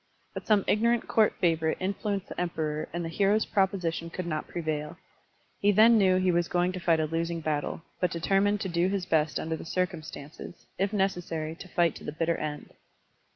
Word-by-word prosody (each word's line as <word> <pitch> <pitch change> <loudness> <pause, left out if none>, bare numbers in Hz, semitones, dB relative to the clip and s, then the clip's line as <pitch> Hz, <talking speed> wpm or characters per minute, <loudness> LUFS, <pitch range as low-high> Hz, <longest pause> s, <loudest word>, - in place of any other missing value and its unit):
But - - -7
some 210 -3 +4
ignorant 235 +2 +2
court 220 -2 +3
favorite 160 -2 +1
influenced 195 +1 -2
the - - -4
Emperor 155 -3 -2
and 170 0 -3
the - - -2
hero's 200 +5 +2
proposition 180 -4 0
could 180 +1 -5
not 155 -3 -3
prevail. 155 -1 -3 0.6
He 205 - +4
then 220 +3 +6
knew 185 -2 +4
he 185 0 +2
was 175 0 +1
going 175 +1 +1
to 185 - -5
fight 165 -2 +2
a 155 - +1
losing 165 +2 -2
battle, 155 0 -2 0.2
but 180 - +2
deter 185 +4 +1
mined 205 0 +1
to - - -2
do 175 0 +1
his 195 -1 -1
best 155 -4 +1
under 160 0 -2
the - - -8
circimistances, 160 -3 -5
if 195 +1 +1
necessary 175 -6 -1
to 170 - -11
fight 170 -3 +2
to - - -13
the - - -4
bitter 165 +2 0
end. 150 -1 -5
175 Hz, 200 wpm, -28 LUFS, 160-195 Hz, 0.6 s, then